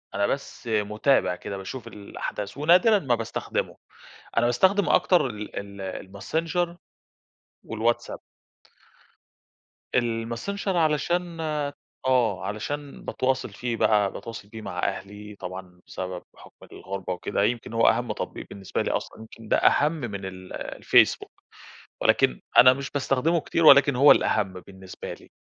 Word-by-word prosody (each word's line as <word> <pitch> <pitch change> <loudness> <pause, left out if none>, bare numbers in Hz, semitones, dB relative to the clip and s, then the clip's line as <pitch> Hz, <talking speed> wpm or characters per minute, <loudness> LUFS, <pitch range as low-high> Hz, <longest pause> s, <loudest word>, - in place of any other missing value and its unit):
أنا 100 0 +2
بس 135 -2 -5
مُتابع 105 -1 +1
كده 100 - -6
باشوف 105 +5 -7
الأحداث 105 0 -6
ونادرًا 180 +8 +5
ما 130 -7 +1
باستخدمُه، 115 -1 -3 0.6
أنا 115 - +4
باستخدم 190 +11 +3
أكتر 180 -7 +4
ال 105 -3 -7
ال 100 0 -9
الماسنجر 160 - -3 0.9
والواتساب. 115 +2 -1 1.8
الماسنجر 120 - -1
علشان 165 +2 0 0.7
آه، 125 -3 +2
علشان 140 +7 -5
باتواصل 130 0 -1
فيه 120 -1 -4
بقى، 105 -3 +3
باتواصل 115 -3 -8
فيه 110 0 -9
مع - - -6
أهلي 105 +1 -4
طبعًا 90 -1 -8
بسبب 90 -1 -6
بحُكم - - -17
الغربة 95 -1 -5
وكده، 90 +2 -2
يمكن 115 +1 -1
هو 115 - +4
أهَم - - +2
تطبيق - - -5
بالنسبة 95 -3 -4
لي - - -1
أصلًا، - - -4
يمكن 110 0 -12
ده - - +3
أهَم 150 +1 +4
من 115 -11 -5
ال 95 -1 -9
الفيسبوك، - - +2 0.7
ولكن 60 - +3 0.2
أنا 130 +1 +9
مش 140 +1 -6
باستخدمه 145 +4 +1
كتير 165 +2 0
ولكن 140 -2 +8
هو 140 +3 +7
الأهَم 100 -3 +2
بالنسبة 95 -1 -9
لي، - - -16
115 Hz, 130 wpm, -25 LUFS, 100-145 Hz, 1.8 s, أنا